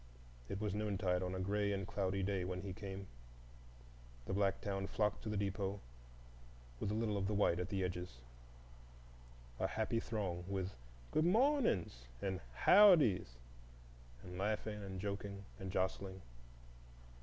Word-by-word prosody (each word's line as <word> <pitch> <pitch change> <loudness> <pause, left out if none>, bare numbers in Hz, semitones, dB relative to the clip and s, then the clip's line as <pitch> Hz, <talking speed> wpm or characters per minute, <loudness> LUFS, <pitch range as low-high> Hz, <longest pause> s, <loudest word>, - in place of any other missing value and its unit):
It 100 - -3
was 105 -2 -1
noontide 100 -4 0
on 90 0 -2
a - - -3
gray 100 +2 +1
and 95 -1 -1
cloudy 95 0 -1
day 95 -1 0
when 90 0 -3
he 95 -2 -4
came. 95 0 -6 1.2
The - - -3
black 100 0 +2
town 95 -1 -2
flocked 105 +1 0
to 110 - -4
the 105 - -1
depot, 100 0 -1 1.0
with - - -1
a 105 - 0
little 110 -2 0
of 95 -1 0
the 105 - 0
white 95 -4 +3
at 90 +2 -2
the 95 -2 0
edges,—a - - -8
happy 110 +1 0
throng, 95 -7 -2
with 95 -1 -2 0.4
"Good 155 - +3
mawnings" 215 - +2
and 95 +3 -2 0.3
"Howdys" 160 - +7 0.9
and 90 0 -7
laughing 105 +1 -1
and 95 -1 -5
joking 100 0 -4
and 95 -2 -4
jostling. 95 0 -2
95 Hz, 145 wpm, -38 LUFS, 90-105 Hz, 1.2 s, Howdys